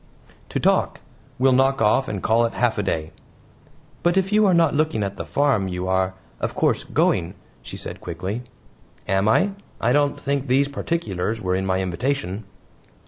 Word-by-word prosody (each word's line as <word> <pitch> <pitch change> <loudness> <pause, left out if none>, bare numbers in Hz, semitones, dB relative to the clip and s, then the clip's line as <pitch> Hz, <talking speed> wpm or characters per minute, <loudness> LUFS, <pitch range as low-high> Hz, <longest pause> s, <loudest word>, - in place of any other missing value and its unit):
"To - - -2
talk. - - +2 0.4
We'll 130 +1 +4
knock 135 +1 +3
off 110 +5 +3
and 100 -4 -4
call 115 +1 +3
it 115 - -3
half 120 -3 +1
a - - +2
day." 80 -5 -2 0.9
"But 175 +2 +2
if 190 +1 +1
you 210 0 +4
are 185 - +4
not 165 -3 +4
looking 150 -8 +1
at 100 0 -3
the - - -5
farm 135 -9 +2
you 90 0 -3
are, 95 0 +1 0.2
of - - -3
course, - - +1
going," 85 +3 +1 0.3
she - - -8
said - - -7
quickly. 95 +7 -4 0.7
"Am 95 +2 +2
I? 195 - +3 0.3
I 120 +2 +2
don't 145 0 +2
think 140 -1 -2
these 135 +3 +3
particulars 115 - -2
were 90 -3 -1
in 95 +1 -1
my 95 0 +1
invitation." 100 +1 -2
115 Hz, 180 wpm, -23 LUFS, 95-140 Hz, 0.9 s, We'll